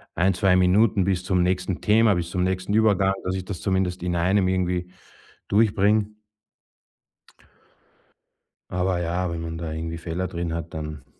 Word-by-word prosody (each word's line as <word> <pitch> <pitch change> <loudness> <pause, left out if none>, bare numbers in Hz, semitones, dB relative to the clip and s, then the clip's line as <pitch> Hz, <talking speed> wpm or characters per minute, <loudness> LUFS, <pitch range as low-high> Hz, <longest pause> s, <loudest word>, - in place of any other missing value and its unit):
1, 95 +3 +2
2 95 0 +3
Minuten 95 +3 +3
bis 95 -1 0
zum 90 -1 +1
nächsten 90 0 -1
Thema, 110 -1 +4
bis 85 -1 -3
zum 90 0 -1
nächsten 95 +2 -1
Übergang, 100 -3 +3
dass 90 +1 -2
ich 95 -1 -5
das 95 -2 -6
zumindest 95 -2 -1
in 90 -1 -1
einem 95 +3 +2
irgendwie 90 -1 -1 0.6
durchbringe. 105 0 +3 2.6
Aber 90 0 0
ja, 90 +1 -1
wenn 85 0 -4
man 80 0 -5
da 85 -2 -5
irgendwie 80 +1 -4
Fehler 85 +2 -3
drin 85 -2 -4
hat, 85 0 -5
dann 75 -3 -6
90 Hz, 155 wpm, -24 LUFS, 85-95 Hz, 2.6 s, Thema